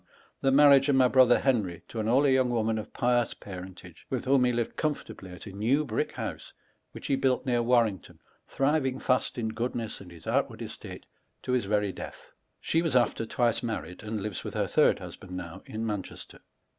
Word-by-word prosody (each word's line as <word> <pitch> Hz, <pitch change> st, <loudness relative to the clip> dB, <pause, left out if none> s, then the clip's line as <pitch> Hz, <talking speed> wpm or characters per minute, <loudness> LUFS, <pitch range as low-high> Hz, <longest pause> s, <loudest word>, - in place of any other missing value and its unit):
The 135 Hz, -, +3 dB
marriage 140 Hz, 0 st, +6 dB
of 140 Hz, -, +4 dB
my 130 Hz, -1 st, +5 dB
brother 125 Hz, -1 st, +5 dB
Henry 105 Hz, -11 st, 0 dB
to 115 Hz, -, -5 dB
an 110 Hz, -, -1 dB
holy 135 Hz, +3 st, +4 dB
young 130 Hz, -1 st, +3 dB
woman 115 Hz, -2 st, 0 dB
of 110 Hz, -, -8 dB
pious 120 Hz, -1 st, +1 dB
parentage, 90 Hz, -2 st, -10 dB
with 130 Hz, -3 st, -3 dB
whom 130 Hz, -1 st, +4 dB
he 125 Hz, -, +3 dB
lived 120 Hz, -1 st, -2 dB
comfortably 145 Hz, -, -4 dB
at 90 Hz, -, -10 dB
a 100 Hz, -, -8 dB
new 120 Hz, +10 st, +1 dB
brick 110 Hz, -5 st, -2 dB
house, -, -, -6 dB, 0.4 s
which -, -, -8 dB
ho 140 Hz, -, +2 dB
built 130 Hz, -1 st, +1 dB
near 120 Hz, -2 st, +2 dB
Warrington 115 Hz, -6 st, +1 dB, 0.3 s
thriving 135 Hz, -2 st, +1 dB
fast 125 Hz, -1 st, 0 dB
in 110 Hz, -2 st, -3 dB
id 115 Hz, -5 st, -4 dB
his 85 Hz, -1 st, -14 dB
outward -, -, -1 dB
estate -, -, -9 dB, 0.4 s
to -, -, -3 dB
his 125 Hz, -4 st, +1 dB
very 105 Hz, -1 st, 0 dB
ileatli. -, -, -9 dB, 0.3 s
She 165 Hz, -, +1 dB
was 165 Hz, -6 st, -1 dB
after 120 Hz, -2 st, +2 dB
^^ni -, -, -16 dB
twice 120 Hz, -3 st, +1 dB
married, 110 Hz, -6 st, -5 dB
and 110 Hz, -2 st, -4 dB
lives 105 Hz, -3 st, -4 dB
with -, -, -6 dB
hor -, -, +1 dB
third -, -, +3 dB
husband 90 Hz, -1 st, -9 dB
now, 90 Hz, +1 st, -7 dB
in 110 Hz, +1 st, -4 dB
Mancheaterj 105 Hz, -4 st, -5 dB
2. -, -, -14 dB
120 Hz, 200 wpm, -28 LUFS, 105-130 Hz, 0.4 s, marriage